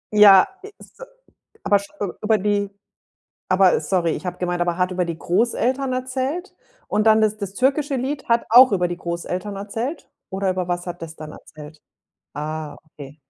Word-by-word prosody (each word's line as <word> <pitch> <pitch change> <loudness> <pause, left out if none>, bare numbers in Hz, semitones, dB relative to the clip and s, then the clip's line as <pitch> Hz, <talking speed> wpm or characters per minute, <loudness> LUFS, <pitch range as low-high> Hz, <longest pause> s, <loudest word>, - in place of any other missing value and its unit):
Ja, 200 -3 +8 0.3
ist - - -18
a - - -7 0.6
aber 205 - +4 0.4
über 215 0 +2
die 205 0 0 0.8
aber 185 0 +4
sorry, 170 +1 0
ich - - -5
habe 180 - -4
gemeint 175 -1 -2
aber 175 0 0
hat 180 0 0
über 180 -1 -1
die 170 -1 -5
Großeltern 240 +8 0
erzählt? 260 +7 -3 0.4
Und 210 +1 +1
dann, 220 0 +5
das 215 0 +1
das 200 -2 -6
türkische 275 +4 +1
Lied 270 +3 -3
hat 235 0 +2
auch 250 +1 +8
über 180 -2 +1
die 175 - -4
Großeltern 180 +4 -4
erzählt? 225 +10 -5 0.2
Oder 190 0 -1
über 185 -1 -3
was 175 0 -2
hat 175 -1 -7
das 160 -1 -8
dann 155 -1 -9
erzählt? 150 0 -13 0.6
Ah, 150 0 -5
okay. 140 0 -12
195 Hz, 170 wpm, -21 LUFS, 175-235 Hz, 0.8 s, Ja